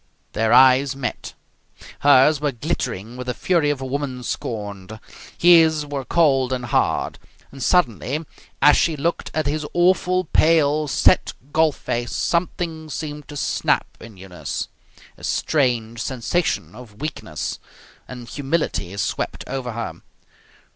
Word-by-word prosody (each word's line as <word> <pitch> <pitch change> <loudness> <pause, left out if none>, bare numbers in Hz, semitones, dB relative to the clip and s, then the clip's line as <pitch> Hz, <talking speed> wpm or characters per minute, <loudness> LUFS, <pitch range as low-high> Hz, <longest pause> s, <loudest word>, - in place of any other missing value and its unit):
Their 110 0 +1
eyes 130 +1 +6
met. 135 -3 -5 0.6
Hers 145 +1 +5
were 145 -1 +1
glittering 115 -1 -4
with 125 0 -7
the 125 - -2
fury 170 -5 +1
of 145 -2 -1
a - - -4
woman 130 -2 -3
scorned. 105 -3 -5 0.4
His 160 -3 +5
were 140 -2 -5
cold 135 -6 +2
and 125 -1 -2
hard. - - 0 0.3
And, 135 - -11
suddenly, 140 - +1 0.4
as 150 0 +8
she 165 - +2
looked 170 +5 -2
at 155 - 0
his 150 +1 -1
awful, 185 +1 +3
pale, 155 -2 +3
set - - +3 0.2
golf 160 -2 +3
face, 120 0 -3
something 170 -2 -2
seemed 150 -1 -6
to 145 - -8
snap - - +1
in 110 -3 -12
Eunice. 90 -5 -5 0.5
A - - -16
strange 120 -6 0
sensation 130 +8 -1
of 110 -5 -13
weakness 150 0 -5 0.5
and 125 -2 -9
humility 140 - -2
swept 100 - -2
over 125 -2 -4
her. 115 0 -5
140 Hz, 135 wpm, -22 LUFS, 120-155 Hz, 0.6 s, as